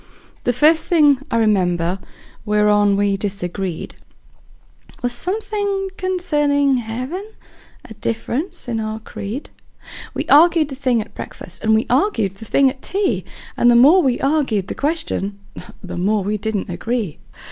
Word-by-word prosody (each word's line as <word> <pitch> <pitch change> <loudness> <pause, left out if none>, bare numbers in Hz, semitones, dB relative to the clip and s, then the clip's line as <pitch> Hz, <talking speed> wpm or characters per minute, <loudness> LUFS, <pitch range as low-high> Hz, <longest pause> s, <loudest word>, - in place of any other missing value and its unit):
The 245 - +3
first 305 +6 +4
thing 295 -6 +4
I - - 0
remember 185 -5 +1 0.4
whereon 210 -1 +3
we 200 -1 +2
disagreed 190 -3 -4 1.1
Was 245 - +1
something 400 - -2
concerning 295 -8 +1
heaven 250 - -4 0.6
a 220 - -10
difference 240 - -3
in 230 -2 -2
our 215 0 -3
creed; 220 +4 -7 0.6
We - - -1
arg'ed 320 0 +5
the 270 - -5
thing 255 -4 +1
at 215 - -10
breakfast, 175 - -8
we 220 +1 +3
arg'ed 235 - +1
the 225 - -10
thing 275 +5 +3
at 265 0 -3
tea, 395 0 -1 0.3
And 240 - +4
the 240 - +5
more 295 +10 +7
we 260 -6 +1
arg'ed 270 -10 0
the - - -2
question 285 - -2 0.5
the - - -6
more 200 +3 +1
we 210 +2 -2
didn't 210 -3 -3
agree. 220 -2 -3
240 Hz, 140 wpm, -20 LUFS, 205-295 Hz, 1.1 s, more